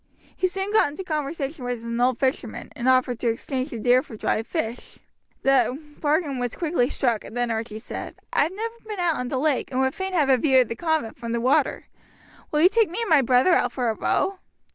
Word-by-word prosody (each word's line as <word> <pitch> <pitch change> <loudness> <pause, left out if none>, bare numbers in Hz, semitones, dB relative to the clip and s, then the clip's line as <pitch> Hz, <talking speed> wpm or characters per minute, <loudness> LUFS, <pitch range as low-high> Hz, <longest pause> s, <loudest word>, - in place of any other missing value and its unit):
He 370 - +1
soon 385 +2 -3
got 435 - +5
into 300 +6 -6
conversation 300 -3 -3
with 245 -2 -3
an 235 +1 -2
old 250 -1 +3
fisherman, 265 0 -2
and 250 +1 0
offered 255 -2 +2
to 245 - -1
exchange 255 +4 -2
the 235 - -6
deer 245 +3 +4
for 225 - -11
dried 220 +1 -1
fish. 240 -8 -4 0.5
The 270 -1 +3 0.2
bargain 295 -3 0
was 245 -2 -2
quickly 310 -7 0
struck, 240 -7 0
and 235 - -9
then 245 -1 0
Archie 220 -1 -3
said: 220 - -7 0.2
"I - - +4
have 305 +4 +1
never 450 +4 -4
been 420 -3 -5
out 345 -3 +1
on 250 - -3
the 260 - -2
lake, 285 0 0
and 255 - -2
would 265 0 +2
fain 380 0 -4
have 310 -6 +3
a 265 -1 +5
view 260 0 +4
of 245 - -1
the 230 - -3
convent 315 -6 -1
from 235 -1 -4
the 235 - 0
water. 255 +4 +1 0.6
Will 300 - +1
you 360 - +7
take 445 -1 +2
me 355 - -4
and 455 - -2
my 300 -3 +7
brother 255 +7 +4
out 245 -6 +2
for 245 -3 0
a - - -2
row?" 385 - 0
265 Hz, 235 wpm, -24 LUFS, 245-320 Hz, 0.6 s, you